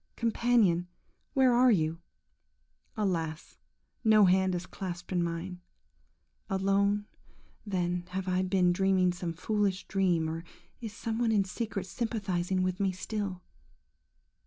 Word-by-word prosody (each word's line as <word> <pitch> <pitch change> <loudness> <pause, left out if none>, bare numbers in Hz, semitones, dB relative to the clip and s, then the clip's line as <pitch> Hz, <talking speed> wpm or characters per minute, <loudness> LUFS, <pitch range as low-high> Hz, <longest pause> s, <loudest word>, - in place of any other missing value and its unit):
Companion, 230 -6 +2 0.5
where 260 -2 +5
are 250 +1 +5
you? 165 -6 +1 1.0
Alas! 165 -6 -2 0.4
no 215 -2 +6
hand 185 0 +3
is 175 0 -4
clasped 175 -1 -7
in 180 -1 +1
mine. 170 +2 -4 0.9
Alone, 200 +1 +1 0.6
then, 180 -2 -1
have 190 +1 -4
I 185 0 +1
been 185 -1 +2
dreaming 185 -1 +2
some 175 -1 -4
foolish 200 +2 -1
dream, 180 -5 +1
or 165 +1 -4 0.4
is 225 -3 -6
some 225 +2 -4
one 235 -2 +2
in 205 -3 +3
secret 200 0 -4
sympathising 190 -5 -1
with 185 +1 -1
me 195 -1 +2
still? 185 0 -4
190 Hz, 125 wpm, -30 LUFS, 180-205 Hz, 1.0 s, no